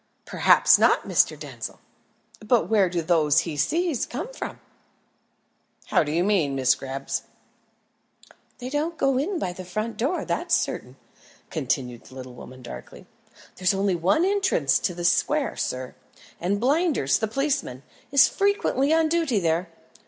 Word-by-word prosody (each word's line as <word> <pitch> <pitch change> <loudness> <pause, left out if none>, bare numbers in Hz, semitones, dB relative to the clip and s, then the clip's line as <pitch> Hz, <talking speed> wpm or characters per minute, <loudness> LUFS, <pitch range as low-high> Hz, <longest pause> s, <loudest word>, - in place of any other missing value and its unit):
"Perhaps - - +5
not, - - +4
Mr. - - +2
Denzil; - - -8 0.6
but 230 +2 +1
where 205 -4 +3
do 170 -1 -2
those 155 -4 +3
he 165 -3 -5
sees 320 - 0
come 335 - -6
from?" - - -6 1.3
"How - - +4
do 150 - -4
you 170 +3 +1
mean, 180 -9 +1
Miss 130 -1 +3
Greeb?" 135 0 -7 1.5
"They 250 - -7
don't 315 +3 -2
go 270 -1 +2
in 355 +7 -1
by 180 - -3
the 185 +1 -8
front 215 +5 -4
door, 275 +10 -1
that's - - 0
certain," - - -3 0.6
continued 125 -5 -3
the 130 - -15
little 130 -1 -9
woman 130 +1 -12
darkly. - - -10 0.5
"There's 185 +1 +2
only 195 0 +1
one 190 - +2
entrance 385 - +2
to 180 - -2
this 175 0 +3
square, 295 -1 0
sir, 130 0 -4 0.5
and 195 +4 -1
Blinders, 280 - +2
the 220 - -1
policeman, 270 - -2 0.3
is 275 -1 +6
frequently 400 - +1
on 320 0 +3
duty 320 -7 +1
there. 170 0 0
200 Hz, 150 wpm, -24 LUFS, -, 1.5 s, is